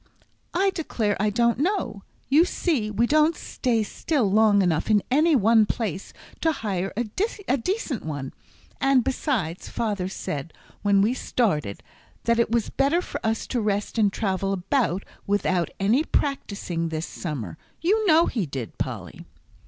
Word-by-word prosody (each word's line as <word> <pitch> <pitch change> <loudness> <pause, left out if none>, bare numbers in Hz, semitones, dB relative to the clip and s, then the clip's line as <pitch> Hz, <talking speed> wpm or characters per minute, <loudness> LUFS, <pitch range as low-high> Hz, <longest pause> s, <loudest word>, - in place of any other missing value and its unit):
"I 390 +2 +3
declare 230 - -1
I 210 +1 +2
don't 235 +2 +2
know. 285 - -1 0.3
You 295 +5 +5
see 305 - 0
we 215 +3 +1
don't 310 +4 +3
stay 235 -6 -1
still 240 -1 -1
long 210 -1 +5
enough 165 0 0
in 210 -2 +4
any 310 +4 +4
one 220 -2 +5
place 200 -6 -3 0.3
to 325 - +2
hire 195 -8 -2
a 240 - +1
decent 365 - -2
one; 145 -4 -5 0.5
and 270 -2 +4
besides, 225 - -2
father 205 -5 -2
said, 155 -4 -5 0.3
when 200 -1 +4
we 225 +4 +2
started, 155 - -1 0.4
that 235 0 +2
it 235 - +2
was 230 -1 0
better 285 +6 +2
for - - -6
us 220 -1 0
to 245 - -1
rest 210 +1 -1
and 205 -2 +4
travel 195 -1 -1
about 195 0 0 0.2
without 185 -4 +1
any 220 +9 +3
practising 200 - -2
this 160 +1 -3
summer. 125 - -5 0.2
You 415 +7 +2
know 330 0 +6
he 210 -9 -2
did, 135 -5 -6
Polly." - - -5
220 Hz, 150 wpm, -25 LUFS, 195-275 Hz, 0.5 s, know